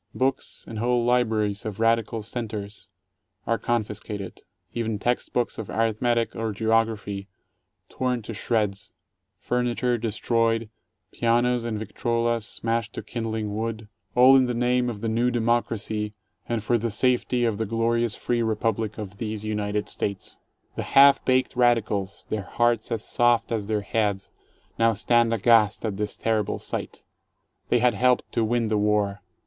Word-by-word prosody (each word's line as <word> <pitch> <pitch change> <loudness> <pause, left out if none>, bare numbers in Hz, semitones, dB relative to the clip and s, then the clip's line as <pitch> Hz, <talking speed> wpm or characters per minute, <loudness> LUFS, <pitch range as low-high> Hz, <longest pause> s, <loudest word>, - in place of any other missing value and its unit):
Books 130 +1 -1
and 110 - -6
whole 120 +1 +1
libraries 110 -4 +1
of 110 -1 -5
"radical 115 -1 +1
cen 115 +2 -4
ters" 105 -1 -7 0.6
are 115 0 0
confiscated, 105 -4 -3 0.3
even 115 -2 -2
text 120 +4 -1
books 120 -2 -1
of 110 - -6
arithmetic 115 +1 0
or 115 -1 -2
geography 110 -2 0 0.6
torn 125 -3 -2
to 115 - -6
shreds, 105 -3 -2 0.4
furniture 125 0 0
destroyed, 115 0 0 0.4
pianos 120 +1 +1
and 115 -2 -2
victrolas 115 +1 -1
smashed 115 -1 -2
to - - -6
kindling 110 -3 -3
wood 110 -1 -4
— - - -44
all 130 +2 +8
in 130 -1 +5
the 125 - -2
name 125 +1 +1
of 105 -4 -6
the 115 - -2
new 115 +2 +2
Democracy 115 -3 -1 0.3
and 115 -3 -1
for 120 +2 +2
the 115 +2 -1
safety 125 +2 +2
of 110 -3 -1
the 110 - -1
glorious, 115 +1 0
free 120 -1 -1
Republic 110 -1 -1
of 100 -2 -7
these 110 0 -4
United 105 -1 -2
States. 100 -2 -4 0.4
The - - -2 0.2
half 140 0 +8
baked 130 -1 +1
radicals, 110 -6 +1
their 110 - -1
hearts 120 +4 0
as 115 -2 -2
soft 120 -1 +2
as 110 -3 -2
their 105 -1 0
heads, 100 -1 -1 0.5
now 115 0 +4
stand 120 +2 +2
aghast 115 0 +3
at 105 -3 -2
this 105 0 -2
terrible 110 -2 0
sight. - - -6 0.7
They - - +4
had 120 +1 +3
helped 125 -1 +2
to 115 - +1
win 115 +1 +1
the 105 -1 +1
war. 105 -1 +1
115 Hz, 155 wpm, -25 LUFS, 105-120 Hz, 0.7 s, all